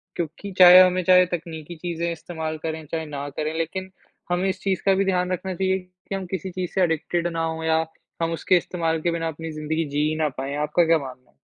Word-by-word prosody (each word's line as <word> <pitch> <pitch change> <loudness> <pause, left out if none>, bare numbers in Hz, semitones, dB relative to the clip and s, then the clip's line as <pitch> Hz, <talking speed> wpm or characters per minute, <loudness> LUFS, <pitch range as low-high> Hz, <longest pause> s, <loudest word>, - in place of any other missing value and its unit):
क्योंकि 170 +4 -5
चाहे 180 0 +11
हमें 185 0 +3
चाहे 180 +1 +6
तकनीकी 165 -1 -8
चीज़ें 170 0 -3
इस्तेमाल 160 -1 -5
करें, 160 -1 -4
चाहे 160 +1 -4
ना 145 -1 -5
करें 155 0 -1
लेकिन 185 +3 -3 0.4
हमें 185 +2 +1
इस - - -4
चीज़ 190 -2 0
का 195 - +5
भी 195 +1 +1
ध्यान 180 -1 +1
रखना 185 +1 -3
चाहिए 190 0 +1
कि 180 +1 -9
हम 195 - -4
किसी 190 0 -3
चीज़ 180 -1 -4
से 190 - +1
एडिक्टेड 165 +1 0
ना 165 0 -1
हों 160 0 -4
या 160 0 +2 0.4
हम 165 0 +1
उसके 180 +2 +3
इस्तेमाल 165 -2 -1
के 170 - +1
बिना 165 -1 -2
अपनी 160 +1 -5
ज़िंदगी 155 +1 -2
जी 145 +1 +1
ही 155 - -2
ना 155 -1 +2
पाएँ। 135 +2 -3
आपका 150 +3 +2
क्या 165 0 +4
मानना 130 -2 -10
है? - - -40
165 Hz, 230 wpm, -24 LUFS, 160-180 Hz, 0.4 s, चाहे